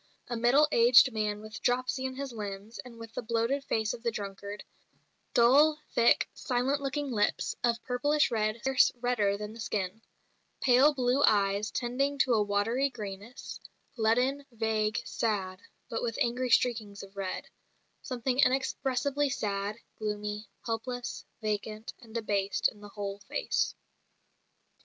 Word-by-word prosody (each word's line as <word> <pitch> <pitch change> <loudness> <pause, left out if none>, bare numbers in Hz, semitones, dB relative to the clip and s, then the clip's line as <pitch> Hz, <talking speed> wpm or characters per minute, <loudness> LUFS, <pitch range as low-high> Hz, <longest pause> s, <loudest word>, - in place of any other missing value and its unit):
A 240 - -2
middle 245 +6 +4
aged 245 +1 +7
man 210 -1 -1
with 215 +1 -9
dropsy 255 +1 0
in 260 0 -3
his 275 -2 -5
limbs, 205 0 -6
and 245 -2 -9
with 230 -1 -10
the - - -3
bloated 230 +4 0
face 220 -5 0
of 240 - -8
the 235 - 0
drunkard; 200 -1 -6 0.7
"dull, 290 +6 +6
thick, 235 0 +4
silent 265 +2 0
looking 280 0 -2
lips, 210 -3 0
of 235 -1 +1
purplish 290 +4 +2
red 215 -1 0
scarce 265 0 +4
redder 220 -5 +1
than 210 +1 -6
the 230 - -12
skin; 205 -1 -3 0.6
pale 270 +4 +5
blue 255 +1 +2
eyes 200 -1 +3
tending 275 +4 -1
to 265 -3 +3
a 220 - +4
watery 210 +7 +1
greyness, 210 0 -8 0.4
leaden, 250 +5 +2
vague, 220 -1 0
sad, 190 -5 -2 0.3
but 225 - -3
with 230 -2 -2
angry 250 +2 0
streakings 220 -5 +1
of 195 0 -13
red; 195 -2 -4 0.6
something 255 0 -2
inexpressibly 270 +1 +1
sad, 205 -5 -2 0.2
gloomy, 210 0 -3 0.2
helpless, 245 +2 -4 0.2
vacant, 215 +2 -3
and 230 -3 -15
debased 200 -3 +1
in 210 - -17
the 205 - -10
whole 200 -1 -5
face." 355 - -1
230 Hz, 145 wpm, -30 LUFS, 210-255 Hz, 0.7 s, aged